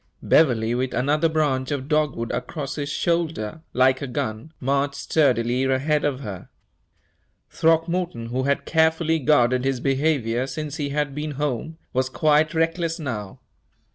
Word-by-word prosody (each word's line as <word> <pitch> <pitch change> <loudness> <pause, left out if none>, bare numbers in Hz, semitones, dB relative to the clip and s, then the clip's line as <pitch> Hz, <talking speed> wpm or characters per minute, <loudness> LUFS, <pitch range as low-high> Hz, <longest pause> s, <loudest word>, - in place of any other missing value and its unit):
Beverley, 120 -7 +3
with 125 +1 -1
another 150 +6 +2
branch 145 -5 0
of 140 -2 -3
dogwood 150 -6 0
across 135 +4 -4
his 145 -1 -4
shoulder, 160 -6 -1
like 130 +1 +3
a 140 - -3
gun, 110 +3 -4
marched 140 +2 0
sturdily 125 -4 +1
ahead 140 +3 +1
of 140 -2 -1
her. 100 -7 -7 1.0
Throckmorton, 165 -6 0
who 125 +2 -1
had 140 0 0
carefully 160 0 +2
guarded 130 -3 +3
his 135 -1 0
behavior 135 -3 0
since 150 +2 -5
he 145 -3 -2
had 145 0 -1
been 150 +1 -4
home, 150 +2 -3 0.2
was 130 +1 +1
quite 155 +3 +2
reckless 165 +1 0
now. 115 - -5
140 Hz, 140 wpm, -23 LUFS, 125-155 Hz, 1.0 s, Beverley